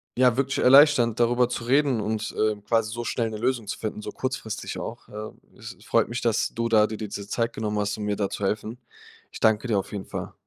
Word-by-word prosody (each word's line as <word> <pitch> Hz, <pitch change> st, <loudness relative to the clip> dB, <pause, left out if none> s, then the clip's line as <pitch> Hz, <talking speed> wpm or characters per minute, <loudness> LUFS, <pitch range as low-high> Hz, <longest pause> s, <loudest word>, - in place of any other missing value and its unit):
ja, 125 Hz, -1 st, +4 dB
wirklich 135 Hz, +1 st, 0 dB
erleichternd, 130 Hz, -4 st, +6 dB
darüber 120 Hz, +1 st, +3 dB
zu 120 Hz, -, -4 dB
reden 135 Hz, -1 st, +2 dB
und, 110 Hz, 0 st, -3 dB
ähm, 105 Hz, -1 st, 0 dB
quasi 115 Hz, 0 st, +1 dB
so 120 Hz, 0 st, -4 dB
schnell 115 Hz, -1 st, -1 dB
'ne 110 Hz, -, -5 dB
Lösung 120 Hz, -1 st, 0 dB
zu -, -, -4 dB
finden, 110 Hz, -1 st, -4 dB
so -, -, -5 dB
kurzfristig 130 Hz, -4 st, -4 dB
auch. -, -, -7 dB
Äh. 105 Hz, +1 st, -7 dB, 0.3 s
Es -, -, -9 dB
es -, -, -21 dB
freut -, -, +2 dB
mich, 120 Hz, -, -3 dB
dass 115 Hz, -2 st, +1 dB
du 115 Hz, 0 st, -1 dB
da 110 Hz, -1 st, +5 dB
d 110 Hz, -, -5 dB
dir 110 Hz, -, -5 dB
diese 100 Hz, 0 st, -7 dB
Zeit 115 Hz, +2 st, -1 dB
genommen 105 Hz, -1 st, -2 dB
hast, 100 Hz, +1 st, -1 dB
um 105 Hz, -, -5 dB
mir 105 Hz, 0 st, -1 dB
da 100 Hz, -1 st, -1 dB
zu 100 Hz, -, -5 dB
helfen. 110 Hz, +3 st, -2 dB, 0.5 s
Ich -, -, -9 dB
danke 110 Hz, +2 st, +2 dB
dir 105 Hz, -4 st, +2 dB
auf 95 Hz, -, -7 dB
jeden 100 Hz, -2 st, -5 dB
Fall. -, -, -6 dB
115 Hz, 245 wpm, -25 LUFS, 105-120 Hz, 0.5 s, erleichternd